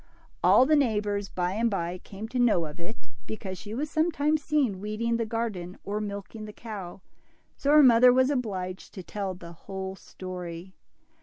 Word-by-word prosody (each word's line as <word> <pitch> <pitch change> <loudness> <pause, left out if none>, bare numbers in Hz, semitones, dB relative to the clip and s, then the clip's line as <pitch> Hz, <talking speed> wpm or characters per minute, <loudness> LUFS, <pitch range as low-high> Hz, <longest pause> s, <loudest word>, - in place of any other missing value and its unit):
All 255 - +7
the 305 +3 +4
neighbors, 210 -7 +1
by 180 0 -1
and 230 +3 +2
by, 180 -3 -2
came 205 +4 -8
to 250 +1 -2
know 220 -9 +4
of 150 +2 -8
it, 220 +8 -8 0.2
because 190 -4 -5
she 215 0 -6
was 295 +4 -2
sometimes 310 -2 +2
seen 275 -11 +1
weeding 215 +3 -1
the 230 -1 -1
garden 210 -6 -3
or 210 +1 -2
milking 205 +1 -6
the 210 - -9
cow, 200 -6 -7 0.5
so 280 - -2
her 300 0 +8
mother 250 0 +8
was 260 +2 +4
obliged 190 -8 -3
to 185 - -6
tell 190 +3 -4
the 170 -1 -10
whole 190 +2 -6
story. 180 -1 -7
210 Hz, 175 wpm, -28 LUFS, 185-240 Hz, 0.5 s, her